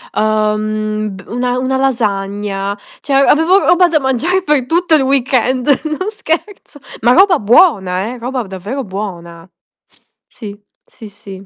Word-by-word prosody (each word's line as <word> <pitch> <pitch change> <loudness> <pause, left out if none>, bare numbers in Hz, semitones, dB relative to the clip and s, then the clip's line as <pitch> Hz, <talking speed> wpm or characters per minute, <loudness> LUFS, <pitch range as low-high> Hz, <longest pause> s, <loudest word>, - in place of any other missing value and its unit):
uhm, 215 0 -1
d 185 - -12
una 245 +1 -2
una 260 +1 -1
lasagna, 205 -5 -2 0.2
cioè, 280 -2 -2
avevo 325 +7 +4
roba 355 -1 +4
da 315 -3 +1
mangiare 320 +9 0
per 295 -5 +1
tutto 335 +3 +1
il 275 - +2
weekend, 260 -1 0 0.2
non 340 +7 -3
scherzo. 395 -6 -5 0.2
Ma 245 0 +4
roba 375 -2 +4
buona 205 - +3
eh! 250 - -7
Roba 250 +2 -3
davvero 200 +8 -6
buona. 180 -4 -8 0.8
Sì, 210 -4 -10 0.3
sì, 225 -4 -13
sì. 195 -1 -12
245 Hz, 135 wpm, -15 LUFS, 205-295 Hz, 0.8 s, avevo